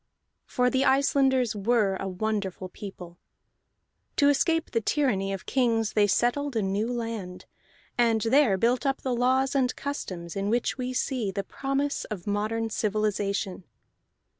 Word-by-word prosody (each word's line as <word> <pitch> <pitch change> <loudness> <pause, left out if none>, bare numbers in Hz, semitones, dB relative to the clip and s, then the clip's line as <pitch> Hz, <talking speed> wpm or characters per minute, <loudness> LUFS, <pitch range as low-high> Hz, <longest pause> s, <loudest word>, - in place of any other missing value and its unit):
For 250 0 +1
the 265 0 +2
Icelanders 265 -3 +3
were 210 -1 +2
a 195 - -4
wonderful 190 -1 -3
people. 180 -3 -10 1.0
To 285 -1 +4
escape 325 +3 +1
the 230 - +1
tyranny 215 -7 +1
of 195 -1 -5
kings 230 -4 +1
they 210 -1 +4
settled 245 +6 +1
a 220 - +1
new 200 +5 -1
land, 225 -6 -5 0.5
and 230 -2 +4
there 230 -2 +4
built 240 +6 +2
up 275 -1 0
the 260 - 0
laws 260 +2 +2
and 260 -3 +1
customs 185 -12 -5
in 195 +1 -1
which 240 +2 0
we 255 -1 -3
see 250 -4 -1
the 195 +1 -3
promise 275 +6 -2
of 195 -6 -6
modern 220 +2 -1
civilization. 205 -3 -1
225 Hz, 145 wpm, -27 LUFS, 200-260 Hz, 1.0 s, To